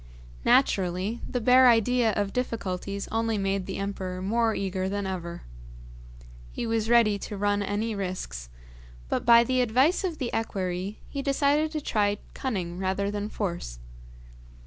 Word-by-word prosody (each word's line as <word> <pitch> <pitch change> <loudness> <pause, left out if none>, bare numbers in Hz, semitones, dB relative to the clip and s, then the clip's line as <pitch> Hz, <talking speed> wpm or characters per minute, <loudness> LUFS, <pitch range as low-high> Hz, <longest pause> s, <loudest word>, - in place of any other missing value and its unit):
Naturally, 195 -2 +2
the 250 - -1
bare 250 +2 +6
idea 235 0 +3
of 200 -1 -1
difficulties 200 -5 -3
only 225 -1 0
made 195 -1 -1
the 190 - -4
emperor 190 -2 -4
more 225 +4 +1
eager 190 -1 -2
than 200 0 -2
ever. 175 -2 -5 1.1
He - - -4
was 225 -1 -1
ready 225 -4 +4
to 205 - -6
run 205 0 +1
any 205 +3 -1
risks, 180 - -5 0.6
but, - - -2
by 235 0 +8
the 255 +1 +1
advice 260 - +3
of 350 -4 -2
the 250 -4 -3
equerry, 190 -2 -2
he 280 - -4
decided 285 +2 +2
to 305 - -2
try 205 -5 +1 0.2
cunning 185 -9 -3
rather 195 +1 -1
than 205 0 -3
force. 170 - -4
205 Hz, 145 wpm, -27 LUFS, 190-235 Hz, 1.1 s, by